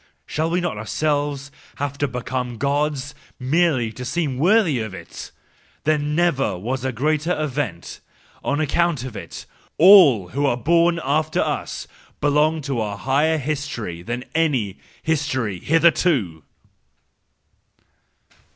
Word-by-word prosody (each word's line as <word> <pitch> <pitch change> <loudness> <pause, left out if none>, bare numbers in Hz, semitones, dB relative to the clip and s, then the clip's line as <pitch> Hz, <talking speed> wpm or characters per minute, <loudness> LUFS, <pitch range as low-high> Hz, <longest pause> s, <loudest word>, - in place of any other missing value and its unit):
Shall 160 +2 -1
we 175 +2 0
not 175 -12 -3
ourselves 145 +3 -2 0.2
have 140 -1 -3
to 145 - +1
become 125 -1 -4
Gods, 145 +2 -1 0.3
merely 130 -3 +1
to 120 +3 -8
seem 140 -1 -2
worthy 175 - +3
of 110 -4 -5
it? 85 - -9 0.5
There 155 0 +2
never 145 - 0
was 125 +7 -3
a 130 - -1
greater 155 +7 0
event,— 145 -1 -3 0.4
and - - -1
on 145 - 0
account 155 -2 +1
of 130 -4 -7
it, - - -8 0.3
all 155 - +7
who 140 +5 0
are 120 - +1
born 170 +4 +3
after 155 +3 0
us - - -3 0.3
belong 150 +2 +2
to 135 -4 -2
a 105 -2 -3
higher 145 +6 +1
history 135 - -4
than 120 +7 -5
any 130 - 0 0.2
history 130 - -1
hitherto!" 155 - +2
145 Hz, 130 wpm, -22 LUFS, 125-155 Hz, 0.5 s, all